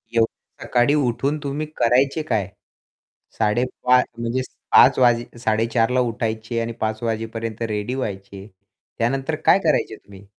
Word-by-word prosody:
एवढ्या 115 -1 -2
सकाळी 120 +3 +2
उठून 140 +1 0
तुम्ही 145 +2 -3
करायचे 130 +6 +2
काय? 110 -9 -1 0.9
5:30 125 +3 +2
म्हणजे 115 +2 -2 0.3
5:00 - - +6
वाजे 120 -1 +4
4:30 115 +1 +1
ला 125 0 +1
उठायचे 110 +1 -3
आणि 115 0 -3
5:00 110 +1 -2
वाजेपर्यंत 115 0 -4
रेडी 105 +4 -2
व्हायचे. 100 -5 -6 0.5
त्यानंतर 135 +6 0
काय - - +6
करायचे 155 -8 +1
तुम्ही? 100 -1 -16
115 Hz, 125 wpm, -22 LUFS, 110-130 Hz, 0.9 s, 5:00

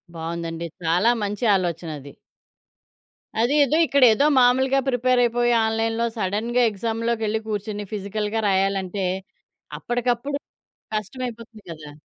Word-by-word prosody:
బావుందండి. 165 0 -4 0.2
చాలా 175 +8 +3
మంచి 205 +3 -2
ఆలోచనది. 160 -6 -4 1.3
అది 240 +5 +2
ఏదో 285 +3 +1
ఇక్కడేదో 270 -2 +4
మామూలుగా 260 +2 +4
ప్రిపేర్ 250 0 +2
అయిపోయి 240 0 +2
ఆన్‌లైన్‌‌లో 225 +1 0
సడెన్‌గా 220 +5 0
ఎగ్జామ్‌లోకెళ్ళి 225 +1 -1
కూర్చొని 210 -1 -4
ఫిజికల్‌గా 210 +2 -2
రాయాలంటే, 195 0 0 0.7
అప్పటికప్పుడు 245 +3 -1 0.6
కష్టమైపోతుంది 230 -1 -6
కదా! 155 -2 -10
220 Hz, 95 wpm, -23 LUFS, 195-240 Hz, 1.3 s, ఇక్కడేదో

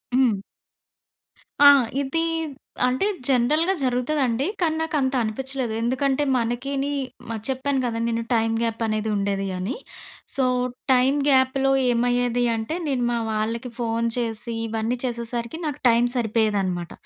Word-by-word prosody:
హ్మ్. 240 -7 +3 1.3
ఆ! - - +12 0.3
ఇది 325 +5 -1 0.6
అంటే 260 +11 +1 0.2
జనరల్‌గా 305 +9 +3
జరుగుతదండి. 255 0 0 0.2
కానీ 320 -2 +2
నాకు 320 -1 -2
అంత 265 0 0
అనిపించలేదు, 255 +1 -2
ఎందుకంటే 265 +4 +1
మనకిని, 270 +4 -1 0.6
చెప్పాను 265 +1 -1
కదా! 230 -1 -2
నేను 230 0 -1
టైమ్‌గ్యాప్ 225 0 0
అనేది 215 0 -1
ఉండేది 195 -1 -1
అని. 190 - -3 0.6
సో, 270 - +1 0.5
టైమ్‌గ్యాప్‌లో 270 0 +3 0.2
ఏమయ్యేది 245 0 +1
అంటే 225 +10 -3
నేను 255 -3 0
మా 235 - 0 0.2
వాళ్ళకి 230 +3 -2
ఫోన్ 230 0 0
చేసి 230 0 -2
ఇవన్నీ 225 +2 -1
చేసేసరికి 235 +4 -3
నాకు 295 -3 -4
టైమ్ 235 +1 +4
సరిపోయేదనమాట. 205 -6 0
245 Hz, 115 wpm, -23 LUFS, 225-270 Hz, 1.3 s, ఆ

